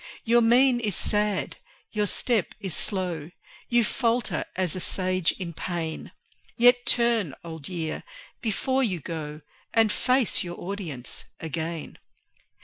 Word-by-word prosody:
Your 235 +1 +5
mien 245 +2 +5
is 210 -6 0
sad, 210 -2 +1 0.3
your 210 -1 +1
step 225 0 +1
is 190 -5 -2
slow; 180 -6 -2 0.4
You 240 -1 +4
falter 235 +1 0
as 185 -3 0
a - - -3
Sage 185 -1 +1
in 175 -3 -6
pain; 165 -1 -4 0.5
Yet 245 +1 +5
turn, 230 - +2
Old 160 -3 -7
Year, 165 -4 -3 0.4
before 260 +4 +1
you 190 -8 0
go, 150 -1 -5 0.3
And 225 -2 +5
face 255 0 +2
your 175 -1 -6
audience 175 -10 -5
again. 160 0 -4
190 Hz, 130 wpm, -26 LUFS, 165-235 Hz, 0.5 s, Your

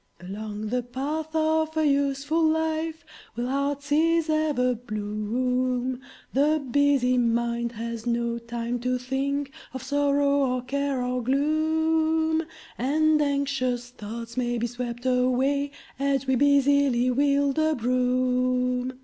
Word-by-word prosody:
Along 210 +3 -6
the 250 +2 0
path 280 +6 -4
of 315 0 +1
a 315 - +3
useful 280 +2 +1
life 320 0 0 0.3
Will 240 +1 -2
heart's 280 +1 -2
ease 325 +1 +3
ever 295 -5 +1
bloom; 245 +4 -2 0.3
The 300 +3 +3
busy 275 -2 +3
mind 235 0 0
has 230 +1 -5
no 235 0 0
time 235 +1 -4
to 250 +1 0
think 270 +2 -2 0.2
Of 260 - -5
sorrow, 285 -2 +2
or 250 - -4
care, 275 0 -1
or 250 0 -1
gloom; 315 +3 +1 0.3
And 305 +4 +2
anxious 270 -4 -1
thoughts 230 0 -8
may 240 -1 0
be 235 - -1
swept 240 0 -5
away 255 +3 +1 0.3
As 275 -1 0
we 265 - +1
busily 280 -2 +3
wield 280 +2 +2
a 315 0 +2
broom. 250 +1 +1
260 Hz, 125 wpm, -26 LUFS, 245-285 Hz, 0.3 s, a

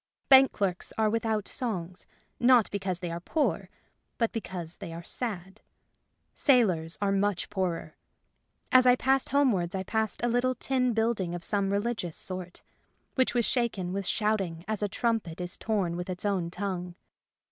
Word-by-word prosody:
Bank 270 0 +8
clerks 185 -3 -2
are 215 -1 +2
without 220 -2 -1
songs, 185 -8 -3 0.3
not 245 -2 +5
because 190 -3 -2
they 175 -2 -3
are 170 - -4
poor, 295 - -1 0.5
but 230 -2 +1
because 180 -7 -5
they 195 -5 -7
are 165 +1 -7
sad. 195 -2 -5 0.7
Sailors 185 - +2
are 200 - +2
much 195 -1 0
poorer. 175 -5 -2 0.8
As 255 0 +6
I 250 - +7
passed 265 +1 +2
homewards 225 -11 +2
I 190 - -2
passed 220 +3 -1
a - - +3
little 245 +2 +1
tin 255 -2 0
building 220 -6 0
of 175 - -6
some 200 0 +1
religious 200 -5 -2
sort, 185 -1 -5 0.5
which 260 -2 +1
was 240 -2 +3
shaken 215 -8 0
with 195 -1 -3
shouting 195 -6 -1
as 215 -1 -2
a 205 - +1
trumpet 220 -6 -1
is 180 +1 -2
torn 195 -6 -1
with 180 +1 -5
its 185 +2 -4
own 190 -4 0
tongue. 180 -1 -4
200 Hz, 160 wpm, -28 LUFS, 180-235 Hz, 0.8 s, Bank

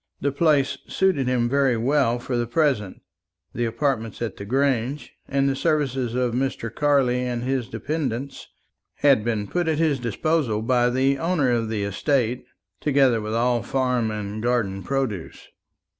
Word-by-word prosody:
The 140 - 0
place 145 -2 +2
suited 185 -9 +1
him 125 -2 +1
very 135 -2 +2
well 125 0 +2
for 125 +1 -4
the 120 -1 0
present; 120 - 0 0.5
the 120 - -1
apartments 115 -2 -1
at 115 -5 -3
the 100 - -8
Grange, 135 +2 0
and 140 0 +1
the 135 - +1
services 135 -6 0
of 125 -2 0
Mr. 125 -3 -2
Carley 135 -4 +2
and 120 -1 -2
his 130 -2 -1
dependents, 140 -3 -4 0.5
had 135 -6 +4
been 110 -3 -1
put 175 - -2
at 160 -2 +1
his 155 -4 +1
disposal 120 -1 0
by 120 0 +2
the 135 +2 +1
owner 160 -6 +1
of 115 -2 0
the 105 -2 -2
estate, 125 +4 0 0.4
together 135 -6 +3
with 105 +1 -3
all 120 0 +2
farm 125 -1 0
and 105 0 -4
garden 110 -5 0
produce. 125 -8 -3
125 Hz, 160 wpm, -23 LUFS, 115-140 Hz, 0.5 s, had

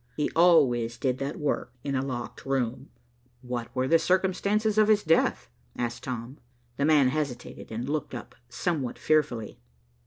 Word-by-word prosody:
He 150 - 0
always 135 -9 +4
did 130 0 -1
that 140 +2 -3
work 145 -4 -2
in 140 - -2
a 130 -1 0
locked 125 -3 -5
room." 130 -3 -2 0.5
"What 125 -2 -4
were 130 0 +1
the 165 +3 +5
circumstances 200 +5 +1
of 215 - +5
his 215 -1 +4
death?" 160 +1 +2 0.3
asked 120 -1 -3
Tom. 125 +1 -5 0.4
The 140 - +1
man 150 -4 +5
hesitated 135 -6 -4
and 115 +3 -4
looked 145 -3 -2
up 120 - -8 0.2
somewhat 135 0 -2
fearfully. 125 -8 0
135 Hz, 155 wpm, -27 LUFS, 125-160 Hz, 0.5 s, the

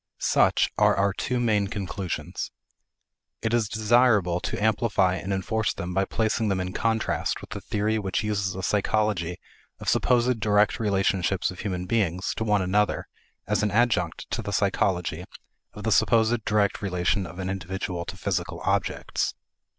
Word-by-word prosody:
Such - - +3
are - - +5
our 100 0 +2
two 125 +5 -2
main 105 -4 +2
conclusions. 95 -3 -4 0.9
It 110 0 0
is 115 -3 +2
desirable 110 -5 +3
to - - -4
amplify 105 -3 +2
and 95 - -5
enforce 110 +3 -1
them 90 +1 -4
by 95 +1 +2
placing 110 +1 0
them 95 -2 0
in 90 0 -3
contrast 110 -1 0
with - - -12
the - - -5
theory 110 +1 0
which 95 0 -1
uses 100 -3 -1
a 95 - -5
psychology 100 -4 0 0.4
of - - -9
supposed 125 -1 +2
direct 105 -1 +2
relationships 95 -3 +1
of 90 - -11
human 90 -3 -3
beings 95 -3 0
to 110 - -1
one 105 -3 +2
another 105 +3 +1 0.4
as 105 +1 0
an 105 - +1
adjunct 105 -6 +1
to - - -1
the 100 - -5
psychology 90 -4 0 0.5
of - - -9
the - - 0
supposed 115 0 +3
direct 105 -2 +1
relation 90 0 0
of 85 - -11
an 95 -1 -3
individual 95 -1 -3
to 95 -1 -7
physical 90 -4 -2
objects. 100 0 -1
100 Hz, 160 wpm, -26 LUFS, 95-110 Hz, 0.9 s, are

